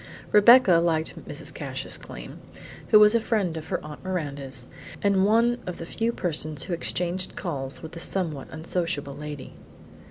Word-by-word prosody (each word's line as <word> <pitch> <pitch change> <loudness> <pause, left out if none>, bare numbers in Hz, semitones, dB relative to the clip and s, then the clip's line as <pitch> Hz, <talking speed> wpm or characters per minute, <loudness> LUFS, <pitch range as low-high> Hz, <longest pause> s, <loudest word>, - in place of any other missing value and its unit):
Rebecca 210 -3 +7
liked 165 -2 -1
Mrs. - - -5
Cassius - - -4
Came, - - -9 0.5
who 215 - +7
was 210 +1 +7
a 230 - +4
friend 205 -7 0
of 160 -1 -6
her - - -1
Aunt 150 -1 -9
Miranda's 140 -8 -3 0.4
and 200 -1 +3
one 235 +3 +3
of 180 - -4
the 165 - -6
few 225 +6 -1
persons 155 -7 -2
who 180 - -4
exchanged 180 +2 -1
calls 135 -6 -4
with 160 - -7
that 165 - -8
somewhat 165 -6 -1
unsociable 160 -3 -3
lady. 145 -1 -8
170 Hz, 160 wpm, -26 LUFS, 150-200 Hz, 0.5 s, Rebecca